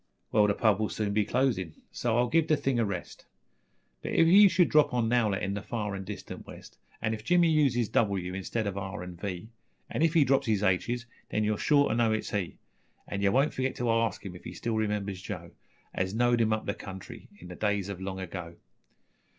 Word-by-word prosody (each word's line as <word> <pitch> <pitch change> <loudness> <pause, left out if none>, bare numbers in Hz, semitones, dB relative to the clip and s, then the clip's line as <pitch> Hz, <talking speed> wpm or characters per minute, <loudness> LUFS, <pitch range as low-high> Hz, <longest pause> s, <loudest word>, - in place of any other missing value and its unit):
Well, 105 -1 +4
the 100 - +1
pub 110 -3 +3
will 110 - 0
soon 105 -2 -2
be 105 0 +2
closin', 105 - 0 0.2
so 120 -1 0
I'll 120 0 +3
give 160 +5 +2
the 155 - +3
thing 130 -3 0
a 115 - +2
rest; 95 -4 -6 0.7
But - - -4
if 165 - +5
you 195 +4 +8
should 175 -2 +3
drop 150 -4 +4
on 120 -2 +1
Nowlett 110 -4 +1
in 95 - -1
the 100 - -3
far 105 -4 -3
an' 95 -1 -5
distant 105 +1 -8
west - - -12 0.2
An' 110 - +1
if 110 -1 -6
Jimmy 170 +4 +4
uses 135 -7 +2
doubleyou 95 -5 0
instead 105 +4 -3
of 100 -1 -3
ar 95 0 -5
an' 90 -1 -8
vee, 95 +2 -6 0.4
An' - - -2
if 165 0 +3
he 160 - +6
drops 135 0 +2
his 105 -2 +1
aitches, 120 +6 0 0.2
then 110 - 0
you're 105 -1 0
sure 145 -1 +4
to - - +1
know 115 -1 +2
it's 110 - -2
he. 95 -5 -3 0.5
An' 100 - -3
yer 100 - +3
won't 135 +8 +2
forgit 130 0 -1
to 120 -1 -1
arsk 115 -2 0
him 90 -2 -6
if 90 - -12
he - - -7
still 115 -1 -2
remembers 105 -3 -2
Joe - - -7 0.4
As 95 +2 -2
knowed 120 0 +3
him 110 -1 +2
up 110 0 -1
the 100 - -1
country 95 -3 -10
in 90 - -12
the 90 - -8
days 105 -2 0
o' 100 - -3
long 95 0 -6
ago. 90 -2 -6
110 Hz, 230 wpm, -29 LUFS, 100-120 Hz, 0.7 s, you